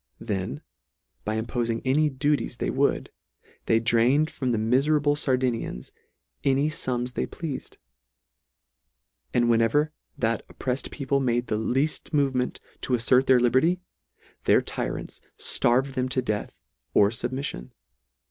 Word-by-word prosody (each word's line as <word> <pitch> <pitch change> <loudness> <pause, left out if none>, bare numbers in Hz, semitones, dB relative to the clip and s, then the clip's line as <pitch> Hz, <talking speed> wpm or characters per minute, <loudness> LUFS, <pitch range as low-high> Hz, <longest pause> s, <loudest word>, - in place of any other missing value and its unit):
Then, 95 - -4 0.6
by 110 +1 -1
impofing 115 0 -1
any 150 +4 +3
duties 145 +2 -1
they - - -1
would, - - 0 0.6
they 115 - +4
drained 120 +7 +3
from 130 -2 -2
the 115 - +1
miferable 145 +6 +2
Sardini 130 -5 0
ans - - -7 0.5
any 140 +2 +2
fums 125 -5 -2
they - - -2
pleafed; 160 -5 -6 1.5
and 120 -1 +2
whenever 120 +6 +3 0.3
that 115 -1 0
opprelfed 130 +1 -3
people 140 -1 -1
made 120 -2 +1
the 110 - 0
leafl 135 +7 -1
move 140 -2 +2
ment 125 0 -1 0.2
to 125 - +1
affert 125 +3 +3
their 130 -1 +6
liberty, 130 +9 +3 0.7
their - - +4
tyrants - - -5 0.2
flarved 130 +3 +2
them 130 -1 -1
to 130 0 0
death 105 -3 -3 0.4
or 100 0 +5
fubmiffion. 125 - -4
125 Hz, 130 wpm, -26 LUFS, 115-140 Hz, 1.5 s, their